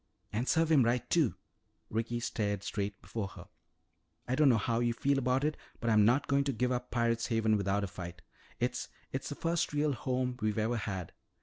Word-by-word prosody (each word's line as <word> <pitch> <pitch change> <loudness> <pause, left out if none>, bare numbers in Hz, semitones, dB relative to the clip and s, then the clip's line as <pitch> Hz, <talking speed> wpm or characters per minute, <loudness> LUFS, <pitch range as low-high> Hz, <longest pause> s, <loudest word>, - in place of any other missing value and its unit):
"And 120 +5 -1
serve 165 0 +3
him 150 -4 +7
right, 120 +1 +1
too." 160 -9 +3 0.6
Ricky 115 +2 -1
stared 105 -4 -1
straight 100 -1 -3
before 110 -4 -3
her. 95 - -11 0.8
"I 125 - 0
don't 145 +1 +5
know 120 - +5
how 115 +2 0
you 120 -1 +2
feel 140 +2 +2
about 130 +1 +1
it, 150 +1 +1 0.2
but 115 -1 0
I'm 105 -1 +6
not 125 +6 +4
going 140 0 +2
to 140 - +1
give 125 +1 0
up 125 0 -2
Pirate's 115 -1 +1
Haven 110 -2 +2
without 100 0 +1
a - - -1
fight. 90 -1 -8 0.4
It's - - -1 0.2
it's - - -3
the - - -4
first 170 -1 0
real 145 0 +2
home 125 0 -1
we've 110 0 0
ever 110 +2 +1
had. 95 -5 -4
120 Hz, 205 wpm, -32 LUFS, 105-130 Hz, 0.8 s, him